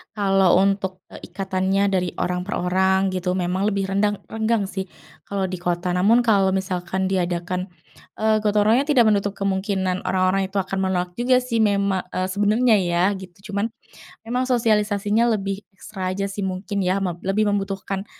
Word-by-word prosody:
kalau 195 Hz, -3 st, +3 dB
untuk, 195 Hz, -1 st, -1 dB
eee, -, -, -10 dB
ikatannya 195 Hz, 0 st, 0 dB
dari 180 Hz, -2 st, +1 dB
orang 180 Hz, +1 st, -2 dB
per 205 Hz, -, -2 dB
orang 190 Hz, +1 st, +1 dB
gitu, 185 Hz, 0 st, -1 dB
memang 185 Hz, +2 st, 0 dB
lebih 200 Hz, -2 st, 0 dB
rendang 205 Hz, +1 st, 0 dB
renggang 220 Hz, -1 st, 0 dB
sih, 190 Hz, -1 st, -5 dB, 0.4 s
kalau 200 Hz, -1 st, -2 dB
di 185 Hz, -1 st, -3 dB
kota. 175 Hz, 0 st, -1 dB
Namun 210 Hz, +7 st, +4 dB
kalau 195 Hz, -4 st, +3 dB
misalkan 190 Hz, 0 st, -2 dB
diadakan, 180 Hz, 0 st, -1 dB, 0.5 s
eee, 220 Hz, 0 st, +2 dB
gotong 210 Hz, -1 st, +2 dB
royongnya, 240 Hz, +7 st, +3 dB
tidak 260 Hz, -6 st, +5 dB
menutup 205 Hz, -1 st, 0 dB
kemungkinan 190 Hz, -1 st, -1 dB
orang-orang 190 Hz, +1 st, +1 dB
itu 190 Hz, -, -23 dB
akan 195 Hz, 0 st, -1 dB
menolak 180 Hz, -1 st, -1 dB
juga 250 Hz, +1 st, +3 dB
sih, 235 Hz, -3 st, -1 dB
mema 200 Hz, -3 st, +1 dB
eee, 185 Hz, 0 st, 0 dB
sebenernya 215 Hz, +4 st, +3 dB
ya, 175 Hz, +1 st, +1 dB
gitu. 190 Hz, +2 st, -12 dB
Cuman 200 Hz, +3 st, 0 dB, 0.5 s
memang 245 Hz, +3 st, -1 dB
sosialisasinya 220 Hz, -1 st, +2 dB
lebih 195 Hz, -1 st, -3 dB
ekstra 190 Hz, -1 st, -5 dB
aja 195 Hz, +1 st, -2 dB
sih, 195 Hz, 0 st, -4 dB
mungkin 190 Hz, +1 st, -3 dB
ya, 190 Hz, +2 st, +1 dB
meb 180 Hz, -3 st, -2 dB
lebih 205 Hz, +2 st, +1 dB
membutuhkan, 195 Hz, -1 st, -3 dB
195 Hz, 165 wpm, -22 LUFS, 185-210 Hz, 0.5 s, tidak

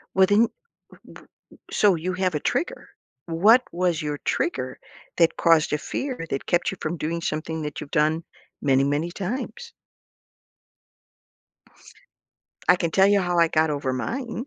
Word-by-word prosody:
Well, 190 Hz, 0 st, +6 dB
then, 215 Hz, +4 st, +4 dB, 0.4 s
w -, -, -17 dB
w -, -, -14 dB
w -, -, -15 dB, 0.4 s
so 200 Hz, -4 st, +4 dB
you 180 Hz, +3 st, -3 dB
have 180 Hz, -3 st, -1 dB
a -, -, -3 dB
trigger. -, -, -3 dB, 0.4 s
What 210 Hz, +10 st, +5 dB
was 175 Hz, -2 st, 0 dB
your 150 Hz, -1 st, -3 dB
trigger 130 Hz, -6 st, -2 dB, 0.4 s
that 165 Hz, -1 st, +3 dB
caused 165 Hz, -2 st, +3 dB
a 150 Hz, -, +1 dB
fear 250 Hz, -, -4 dB
that 135 Hz, -, -3 dB
kept 175 Hz, 0 st, +1 dB
you 195 Hz, -, -7 dB
from 160 Hz, +2 st, -3 dB
doing 165 Hz, +2 st, -3 dB
something 160 Hz, 0 st, -3 dB
that 150 Hz, -1 st, -5 dB
you've 145 Hz, -, -9 dB
done 160 Hz, +2 st, 0 dB, 0.4 s
many, 135 Hz, -1 st, +3 dB
many 145 Hz, +4 st, -1 dB
times? 250 Hz, -, -5 dB, 3.0 s
I -, -, +7 dB
can 170 Hz, -2 st, -1 dB
tell 190 Hz, +3 st, +4 dB
you 200 Hz, -1 st, +4 dB
how 175 Hz, -1 st, 0 dB
I 170 Hz, -1 st, +5 dB
got 155 Hz, 0 st, +2 dB
over 140 Hz, -3 st, -2 dB
mine. 240 Hz, -, -4 dB
170 Hz, 160 wpm, -24 LUFS, 155-190 Hz, 3.0 s, I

